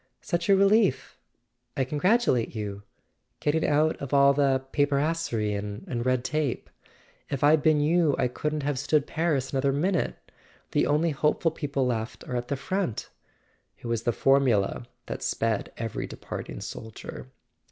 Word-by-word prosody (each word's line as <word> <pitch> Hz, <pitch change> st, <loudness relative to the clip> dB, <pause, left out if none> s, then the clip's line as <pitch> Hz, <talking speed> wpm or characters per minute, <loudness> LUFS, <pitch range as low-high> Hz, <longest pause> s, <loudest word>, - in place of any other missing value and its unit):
"Such 170 Hz, +1 st, -2 dB
a 195 Hz, -, +7 dB
relief... 200 Hz, +1 st, +2 dB, 0.6 s
I 135 Hz, -, +2 dB
congratulate 150 Hz, -, +1 dB
you... 100 Hz, -2 st, -4 dB, 0.6 s
getting 155 Hz, +2 st, +1 dB
out 155 Hz, +2 st, +2 dB
of 140 Hz, 0 st, -3 dB
all 140 Hz, 0 st, +6 dB
this 135 Hz, -2 st, +2 dB
paperasserie 145 Hz, -6 st, 0 dB
and 105 Hz, +4 st, -4 dB
red 130 Hz, -1 st, +1 dB
tape... 150 Hz, -4 st, -2 dB, 0.6 s
If 140 Hz, 0 st, -3 dB
I'd 150 Hz, +1 st, +5 dB
been 155 Hz, 0 st, +4 dB
you 160 Hz, -1 st, +3 dB
I -, -, +2 dB
couldn't 150 Hz, +4 st, -3 dB
have 145 Hz, -2 st, -1 dB
stood 145 Hz, +1 st, +2 dB
Paris 155 Hz, -6 st, -1 dB
another 135 Hz, +1 st, +2 dB
min¬ 165 Hz, +8 st, +1 dB
ute... -, -, -13 dB, 0.6 s
The -, -, +2 dB
only 155 Hz, +3 st, +2 dB
hopeful 150 Hz, +3 st, +1 dB
people 140 Hz, -4 st, -2 dB
left 115 Hz, -2 st, -3 dB
are 125 Hz, -, -3 dB
at 120 Hz, 0 st, -2 dB
the 140 Hz, -, -2 dB
front.. 185 Hz, -, -3 dB, 0.3 s
." -, -, -42 dB
It -, -, -15 dB
was 115 Hz, -1 st, -1 dB
the 120 Hz, -, +1 dB
formula 125 Hz, -4 st, +2 dB, 0.2 s
that -, -, -5 dB
sped 115 Hz, -2 st, -1 dB
every 115 Hz, -2 st, -4 dB
departing -, -, -7 dB
soldier. 110 Hz, -1 st, -8 dB
140 Hz, 155 wpm, -27 LUFS, 120-155 Hz, 0.6 s, a